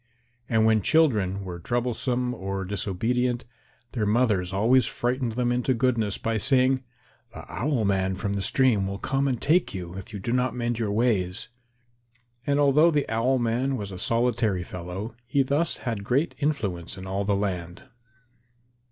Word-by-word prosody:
And 110 -1 +3
when 110 -1 +4
children 100 - +2
were 90 -2 -6
troublesome 125 +4 -1
or 95 -2 -4
disobedient, 120 +6 -1 0.5
their 110 -4 -1
mothers 105 -5 +2
always 115 +7 +3
frightened 125 -1 -1
them 120 +1 0
into 125 +1 +1
goodness 115 -4 +1
by 115 0 -1
saying, 130 +3 +3 0.5
"The - - -8
Owl 130 -4 -1
man 95 -1 +1
from 100 +1 -2
the 100 - -1
stream 110 -3 +2
will 100 0 -4
come 135 +6 0
and 125 -4 -1
take 160 - +2
you 90 -2 -6
if 95 +5 -11
you 105 - -5
do 100 +4 -4
not 125 -1 +1
mend 120 -1 -2
your 110 -3 -1
ways." 105 -3 0 1.0
And 140 0 +2
although 145 +3 +5
the 150 -4 +1
Owl 115 +4 +2
man 125 +3 0
was 100 -3 -5
a 90 - -7
solitary 115 -5 +1
fellow 90 +5 -6
he 135 +3 +2
thus 145 +5 0
had 115 -5 -2
great 135 +10 +1
influence 100 - -2
in 95 - -8
all 95 +1 -2
the 100 0 +1
land. 90 0 -3
115 Hz, 165 wpm, -26 LUFS, 100-125 Hz, 1.0 s, although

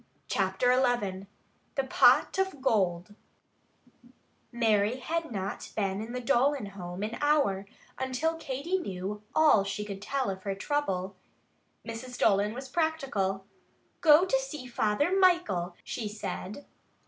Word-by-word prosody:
Chapter 195 +6 +2
XI 240 -7 0 0.5
THE 270 - +1
POT 265 +7 +4
OF 380 -6 -1
GOLD 195 -7 0 1.4
Mary 225 -1 +2
had 325 +3 -3
not 195 -3 -4
been 195 -1 -1
in 225 +2 -6
the 250 - -2
Dolan 270 +1 +2
home 190 -1 -7
an 220 +3 -4
hour 280 -10 +2 0.3
until 260 +5 0
Katy 325 +4 -2
knew 195 - -5
all 305 -10 +5
she 200 +1 -4
could 200 -1 -7
tell 260 0 -1
of 190 0 -7
her 195 0 -3
trouble. 195 -7 -2 0.7
Mrs. 245 +2 -7
Dolan 205 +1 +2
was 265 +1 -6
practical. 260 - -1 0.6
"Go 315 +2 +7
to 265 -8 +2
see 270 0 -6
Father 245 - +1
Michael," 345 - +2
she 225 - -4
said. 210 +3 -6
235 Hz, 130 wpm, -29 LUFS, 195-280 Hz, 1.4 s, Go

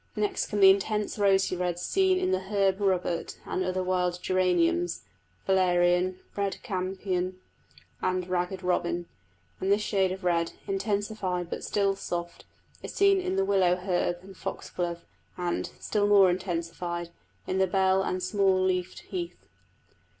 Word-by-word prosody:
Next 210 -1 -1
come 205 - -2
the 190 0 +10
intense 210 +2 -1
rosy 195 -2 +3
reds 180 -1 -2
seen 380 -1 +2
in 280 - 0
the 185 - +2
herb 195 -1 +2
robert 180 -3 0
and 185 - -1
other 185 0 -1
wild 180 -1 0
geraniums, 175 -2 +1 0.4
valerian, 180 -1 +3 0.2
red 200 -1 -1
campion 185 -3 -2 0.6
and 185 -1 0
ragged 180 +1 -2
robin; 175 -1 0 0.5
and 190 - 0
this 205 +1 +3
shade 190 -3 +1
of 190 +1 -6
red, 170 -2 +1
intensified 195 -3 -2
but - - -4
still 200 -1 +1
soft, 175 -2 -5 0.4
is - - -7
seen 395 -1 +4
in 365 - -2
the 195 0 +2
willow 190 -3 +3
herb 180 -1 -1
and 195 0 -12
foxglove, 170 -1 -4 0.3
and, 175 -1 -2
still 205 -1 0
more 200 -3 +6
intensified, 175 -1 -3 0.3
in 190 - -1
the 190 - +3
bell 190 +1 +3
and 185 -1 -2
small 190 0 +2
leafed 185 -1 -1
heath. 350 -2 -5
185 Hz, 145 wpm, -28 LUFS, 180-195 Hz, 0.6 s, the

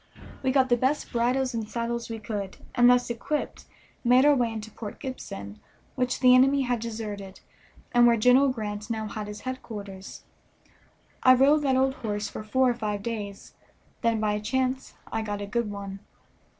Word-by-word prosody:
We 260 - +1
got 260 -1 +3
the 240 - +4
best 265 +5 0
bridles 250 +2 +1
and 225 -2 -3
saddles 235 0 -3
we 225 - -4
could, 205 -3 -5 0.2
and 245 0 +6
thus 245 -1 +3
equipped 290 +6 -3 0.4
made 250 +2 +5
our 295 - +7
way 240 -4 +1
into 220 0 -7
Port 210 -1 -8
Gibson, 100 - -7 0.3
which 250 -1 -1
the 250 -1 +7
enemy 270 +2 +5
had 245 -2 0
deserted 210 -4 -6 0.5
and 240 0 +6
where 235 -1 +4
General 250 +5 +5
Grant 210 -3 -4
now 220 -1 -2
had 210 0 -5
his 210 0 -8
headquarters. 205 -7 -7 1.0
I 255 0 +7
rode 280 +4 +5
that 270 -3 +2
old 265 0 +2
horse 210 -4 -3
for - - -7
four 255 +4 +2
or - - 0
five 210 -4 -3
days, 205 -3 -5 0.5
then 230 -2 +1
by 215 -1 +1
a 210 - -2
chance 260 +4 -1 0.2
I 225 - -1
got 205 -2 -4
a 205 - -4
good 225 +2 -1
one. 200 -1 -6
235 Hz, 180 wpm, -27 LUFS, 210-255 Hz, 1.0 s, our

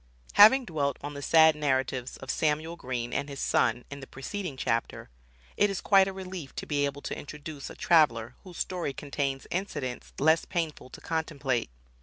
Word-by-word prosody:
Having 250 +6 +8
dwelt 140 - -1
on 145 +1 -6
the 140 - -7
sad 160 +1 +6
narratives 130 -3 -1
of 135 - -4
Samuel 155 +2 0
Green 125 -5 -4
and 140 +1 -2
his 140 -1 -7
son 120 0 +1
in 140 - -6
the 135 - -10
preceding 155 +2 -5
chapter, 115 - -2 0.5
it 205 - +4
is 195 - -2
quite 195 -2 +5
a - - -2
relief 185 -6 -7
to - - -5
be 145 -1 +1
able 140 0 -7
to - - -4
introduce 150 0 -8
a - - -10
traveler 120 -9 +3
whose 180 -3 -11
story 175 -6 -2
contains 140 -1 -3
incidents 145 -9 -4
less 160 +3 +4
painful 165 -7 -3
to - - -12
contemplate. 145 - -2
145 Hz, 180 wpm, -28 LUFS, 135-170 Hz, 0.5 s, Having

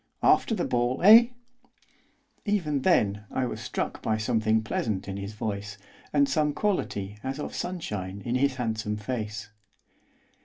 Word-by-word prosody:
'After 225 - +4
the 180 - -1
ball, 120 +1 0
eh?' 225 +4 +9 1.2
Even 170 -10 0
then 105 - +2
I 130 - -1
was - - -5
struck - - -3
by 110 - 0
something 110 0 +1
pleasant 105 -2 -2
in 95 - -4
his 100 +1 -6
voice, 105 -2 -4 0.3
and 140 -1 +4
some 150 +2 +1
quality 105 - -2
as 135 +2 -3
of - - -5
sunshine 100 - -4
in 120 - -1
his 130 +1 +2
handsome 110 -4 -2
face. 110 -1 -4
115 Hz, 145 wpm, -27 LUFS, 105-145 Hz, 1.2 s, eh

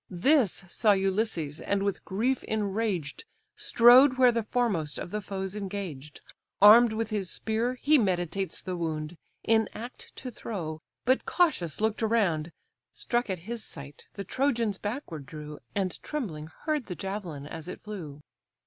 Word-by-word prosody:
This 205 - +2
saw 210 +3 +3
Ulysses, 190 -6 -1
and 200 -1 0
with 200 -1 -2
grief 240 +7 0
enraged, 205 -6 -2 0.3
Strode 255 +3 +7
where 250 -1 +6
the 230 -1 0
foremost 205 - -1
of - - -6
the 210 - -2
foes 190 0 -4
engaged; 185 -8 -6 0.4
Arm'd 220 +3 +9
with 220 0 -2
his 200 -4 -1
spear, 225 +6 -1
he 300 +1 +6
meditates 185 -2 -1
the 185 -1 -4
wound, 160 -1 -3 0.3
In 225 0 +3
act 240 +3 -9
to 255 - -6
throw; 165 -9 -5 0.3
but 260 +2 +2
cautious 295 - +1
look'd 220 +1 0
around, 190 -8 +1 0.4
Struck 240 -2 -1
at 185 -3 -3
his 230 0 -4
sight 140 -3 -8
the 200 - -4
Trojans 235 -5 0
backward 205 - -5
drew, 150 -1 -8 0.2
And 190 -3 -1
trembling 180 - -4 0.2
heard 305 -5 -1
the 180 - -5
javelin 190 -8 -5
as 160 +2 -8
it 180 - -6
flew. 165 -9 -7
200 Hz, 150 wpm, -28 LUFS, 170-230 Hz, 0.4 s, Arm'd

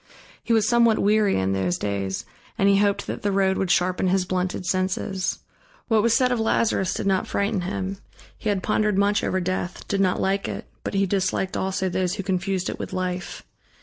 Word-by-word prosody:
He - - -3
was 220 -2 +4
somewhat 235 -2 +4
weary 210 0 +3
in 95 0 0
those 95 -2 0
days 100 -2 -3 0.3
and 195 - +3
he 200 0 +5
hoped 200 -1 +1
that - - -5
the 205 - 0
road 190 -1 +2
would 190 - -1
sharpen 180 +1 +2
his 185 0 +2
blunted 185 0 -2
senses. 185 +1 -1 0.5
What 220 -2 +4
was 230 +1 +3
said 250 -1 +2
of 245 - +1
Lazarus 220 -3 +1
did - - -3
not 190 -1 +1
frighten 200 -1 0
him: 190 +1 -3 0.4
he 215 - -3
had 195 -3 0
pondered 210 -2 +1
much 200 +1 +2
over 185 - 0
Death, 180 0 -3
did 195 -1 0
not 185 -2 +2
like 195 +1 0
it, - - -5 0.2
but - - -4
he 195 0 +3
disliked 190 0 -1
also 190 0 -1
those 185 -1 -1
who 195 - -4
confused 190 0 -1
it - - -4
with - - -5
life. 180 -1 -3
190 Hz, 205 wpm, -24 LUFS, 185-205 Hz, 0.5 s, he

